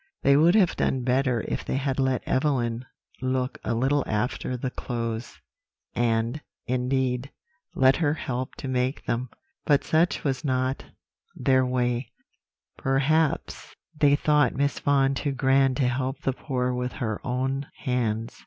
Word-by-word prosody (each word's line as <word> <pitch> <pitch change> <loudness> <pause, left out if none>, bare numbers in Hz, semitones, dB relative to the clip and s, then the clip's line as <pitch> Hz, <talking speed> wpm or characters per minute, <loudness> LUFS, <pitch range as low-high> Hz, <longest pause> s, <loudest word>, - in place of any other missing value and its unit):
"They 140 - +5
would 165 +6 +5
have 195 -6 +4
done 130 -2 0
better 130 -1 +1
if - - -2
they - - -3
had 135 0 -1
let 130 -1 0
Evelyn 130 -4 0 0.3
look 130 0 -1
a 115 - -1
little 135 +5 +2
after 120 +3 -2
the 125 +1 -3
clothes, 115 -2 -4 0.5
and, 115 +4 0 0.2
indeed, 125 +1 0 0.5
let 130 0 +5
her 155 -3 +1
help 130 -4 -4
to - - -7
make 130 +1 -1
them; 120 +2 -2 0.3
but 145 -2 +3
such 165 +3 +1
was 135 0 -1
not 130 -1 -1 0.5
their 130 -1 +3
way; 125 -1 -1 0.7
perhaps 140 +4 0 0.2
they 145 -1 +4
thought 150 0 +2
Miss 140 +1 0
Vaughan 140 -1 +2
too 140 +1 -2
grand 135 0 +3
to 130 - +2
help 130 +2 -2
the 135 - 0
poor 125 -2 -2
with 125 0 -3
her 110 -5 -3
own 135 +1 -2 0.2
hands. 115 -4 -1
130 Hz, 145 wpm, -26 LUFS, 125-140 Hz, 0.7 s, They